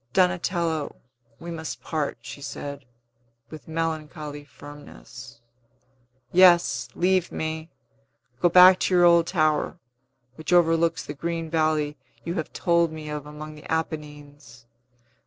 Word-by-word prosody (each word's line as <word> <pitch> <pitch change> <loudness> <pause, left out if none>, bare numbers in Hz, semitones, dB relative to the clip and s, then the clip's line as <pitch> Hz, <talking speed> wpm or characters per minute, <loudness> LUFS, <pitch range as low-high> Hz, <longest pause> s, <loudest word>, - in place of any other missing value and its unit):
"Donatello, 175 -4 0 0.4
we 170 +1 -8
must 160 -1 -6
part," 155 -3 -2
she 140 - -10
said, 140 -1 -7 0.7
with 155 -2 -11
melancholy 155 -2 -4
firmness. 135 -5 -13 0.9
"Yes; 175 -1 +5
leave 185 0 +1
me! 160 +1 -4 0.7
Go 175 - +4
back 180 +1 +8
to 185 - +1
your 175 0 +6
old 170 -1 +5
tower, 155 -2 +1 0.6
which 160 +2 -6
overlooks 165 -1 +3
the 145 - -6
green 165 +1 -4
valley 155 -2 0 0.3
you 170 - -2
have 160 -4 -4
told 170 -2 +1
me 155 -1 -8
of 150 -1 -5
among 150 +1 -9
the 150 +1 -11
Apennines. 145 -6 -5
160 Hz, 120 wpm, -25 LUFS, 150-170 Hz, 0.9 s, back